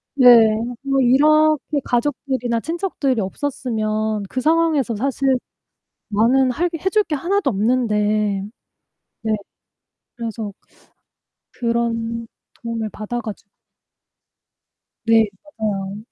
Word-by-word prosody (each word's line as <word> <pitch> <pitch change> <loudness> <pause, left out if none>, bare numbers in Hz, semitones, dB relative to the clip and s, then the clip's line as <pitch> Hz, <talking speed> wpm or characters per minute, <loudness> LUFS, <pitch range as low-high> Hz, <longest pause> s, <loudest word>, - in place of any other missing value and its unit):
네. 255 -3 +4 0.6
뭐 275 -1 +1
이렇게 300 +3 +3
가족들이나 245 -2 -1
친척들이 310 - -1
없었으면 215 -2 -2
그 255 - -3
상황에서 310 -6 +2
사실 270 +3 -1 0.8
나는 240 +5 +3
할 340 +8 0
게 330 - -5
해 380 - 0
줄게 415 -7 +1
하나도 365 +1 0
없는데. 210 -3 +1 0.8
네. 220 -1 0 0.8
그래서 225 -3 -5 1.0
그런 230 -1 -2 0.4
도움을 225 -2 -3
받아 240 +3 -4
가지고 215 -2 -8 1.6
네. 225 -1 +5 0.3
맞아요. 200 -2 -2
240 Hz, 210 characters per minute, -20 LUFS, 215-280 Hz, 1.6 s, 네